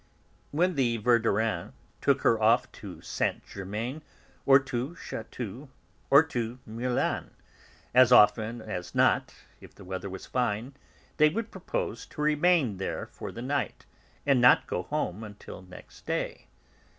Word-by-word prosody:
When 180 +5 +1
the 125 -6 +1
Verdurins 110 -5 +1 0.3
took - - +2
her 115 -1 +3
off 115 +3 +3
to - - -10
Saint - - -2
Germain, 110 +9 -5 0.5
or 135 0 +9
to 135 +3 -3
Chatou, 120 - -7 0.4
or 140 +3 +8
to 120 -6 -4
Meulan, 120 +3 -1 0.6
as 125 0 +6
often 110 0 +5
as 90 -5 -6
not, - - +2 0.2
if - - -15
the 100 - -13
weather 95 +1 -5
was 95 0 -8
fine, 125 +1 -1 0.4
they 155 0 +6
would 225 +7 -4
propose 170 - -4
to - - -8
remain 150 - +3
there 95 - -3
for - - -7
the 115 - -7
night, 140 +2 -2 0.4
and 135 -3 +4
not 125 - +6
go - - -2
home 110 -5 -3
until 105 -3 -10
next 90 -1 -14
day. - - -3
120 Hz, 140 wpm, -28 LUFS, 105-140 Hz, 0.6 s, or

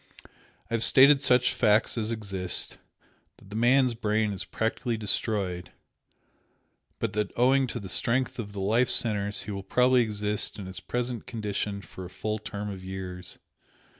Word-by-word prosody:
I - - -4
have 115 - 0
stated 135 +3 +6
such 125 -2 +3
facts 110 -1 +2
as 110 -2 -2
exist 100 -5 -3 0.6
that 100 - -18
the - - -6
man's 125 +2 +3
brain 110 -2 0
is 95 - -5
practically 115 +1 -2
destroyed 100 -4 0 1.2
but - - -3
that 105 -1 -1
owing 130 +2 +3
to 120 - -5
the 100 - -8
strength 125 +7 0
of 105 -3 -5
the 100 -1 -6
life 115 +6 +2
centres 105 -3 +3
he 105 - -7
will 100 -1 -4
probably 125 +5 +3
exist 105 -2 0
in 100 - -7
his 95 0 -7
present 120 -1 -4
condition 105 -3 -3
for 95 +3 -10
a 90 - -8
full 110 +3 -4
term 105 0 -6
of 95 -1 -9
years. 95 -1 -7
105 Hz, 165 wpm, -27 LUFS, 100-120 Hz, 1.2 s, stated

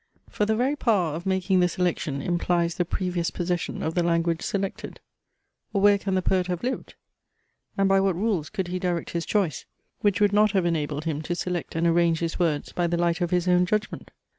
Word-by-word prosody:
For 210 - 0
the 220 - +2
very 260 +6 +1
power 200 - +1
of 170 +4 -5
making 190 0 +2
the 180 - +4
selection 165 -6 -2
implies 175 -1 0
the 175 - -1
previous 175 -1 -1
possession 175 -1 -3
of 160 - -1
the 175 - +1
language 170 -1 +1
selected. 195 -1 -4 0.7
Or 200 - +1
where 205 0 +5
can 195 -1 -2
the 185 - 0
poet 185 -1 +1
have 180 -1 -3
lived? 255 +2 -3 0.8
And 195 0 +3
by 195 0 +4
what 195 -2 +1
rules 185 -6 -1
could 190 -2 -3
he 180 +1 -2
direct 175 -2 -2
his 170 -1 -3
choice, 195 -8 0 0.3
which 205 -2 +1
would 205 -1 +3
not 210 0 +4
have 190 -3 +2
enabled 150 -2 -1
him 155 -2 -2
to 175 +3 -3
select 180 -1 -3
and 165 +1 +1
arrange 170 -1 +3
his 165 +1 -3
words 160 -4 0
by 175 -1 0
the 170 0 0
light 170 +1 0
of 175 - +1
his 180 0 0
own 180 0 +4
judgment? 215 +2 -2
180 Hz, 215 wpm, -25 LUFS, 170-195 Hz, 0.8 s, where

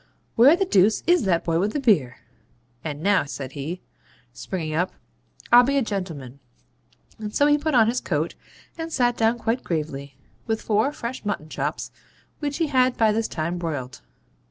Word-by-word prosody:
Where 265 +8 +7
the 390 +2 0
deuce 210 - +3
IS 350 -9 +3
that 170 -3 +2
boy 165 -1 +1
with 205 +4 0
the - - -1
beer? 155 - +2 0.7
And 150 -1 -5
now,' 200 -7 +3
said 135 -2 -6
he, 150 +7 -5 0.5
springing 155 +3 -4
up, 175 +4 0 0.6
'I'll 240 - +9
be 275 +3 +1
a 275 - +2
gentleman.' 160 - -5 0.8
And 210 -1 -6
so 285 - +4
he 295 0 +5
put 310 -1 -1
on 225 -2 +6
his 240 +3 0
coat, 160 -1 -1 0.5
and 325 0 -4
sat 245 -4 +2
down 225 +1 +2
quite 235 +2 -1
gravely, 140 -4 -4 0.3
with 220 -1 0
four 220 +6 +1
fresh 255 -3 -6
mutton 200 -7 -3
chops - - -3 0.5
which 290 -2 -3
he 330 - +1
had 255 -3 +2
by 220 -1 +4
this 225 +1 0
time 170 +2 -3
broiled. 140 -7 -5
210 Hz, 180 wpm, -24 LUFS, 155-245 Hz, 0.8 s, I'll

